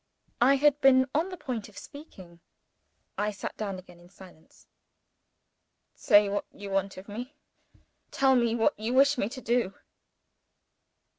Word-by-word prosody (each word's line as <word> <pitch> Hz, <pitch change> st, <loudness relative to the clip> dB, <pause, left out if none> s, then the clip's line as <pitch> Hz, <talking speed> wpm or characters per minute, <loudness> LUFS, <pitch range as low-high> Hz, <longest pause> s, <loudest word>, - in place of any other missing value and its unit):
I 265 Hz, +3 st, +5 dB
had 290 Hz, +1 st, +2 dB
been 260 Hz, -1 st, +5 dB
on 325 Hz, +5 st, 0 dB
the 365 Hz, -, -8 dB
point 240 Hz, -9 st, -5 dB
of 205 Hz, -, -18 dB
speaking. 185 Hz, -, -13 dB, 0.8 s
I 210 Hz, +1 st, 0 dB
sat 205 Hz, -, -7 dB
down 200 Hz, -3 st, -4 dB
again 180 Hz, -1 st, -14 dB
in 175 Hz, 0 st, -18 dB
silence. 180 Hz, -4 st, -18 dB, 1.3 s
"Say 205 Hz, -4 st, +4 dB
what 200 Hz, +1 st, -2 dB
you 200 Hz, -1 st, -9 dB
want 195 Hz, 0 st, -1 dB
of 185 Hz, -, -11 dB
me. 245 Hz, +7 st, -8 dB, 0.7 s
Tell 270 Hz, -1 st, +3 dB
me 235 Hz, -2 st, +2 dB
what 235 Hz, +6 st, +2 dB
you 230 Hz, +4 st, -2 dB
wish 275 Hz, 0 st, +4 dB
me 200 Hz, -, -1 dB
to 260 Hz, -, -9 dB
do." 235 Hz, -6 st, 0 dB
225 Hz, 150 wpm, -28 LUFS, 195-270 Hz, 1.3 s, I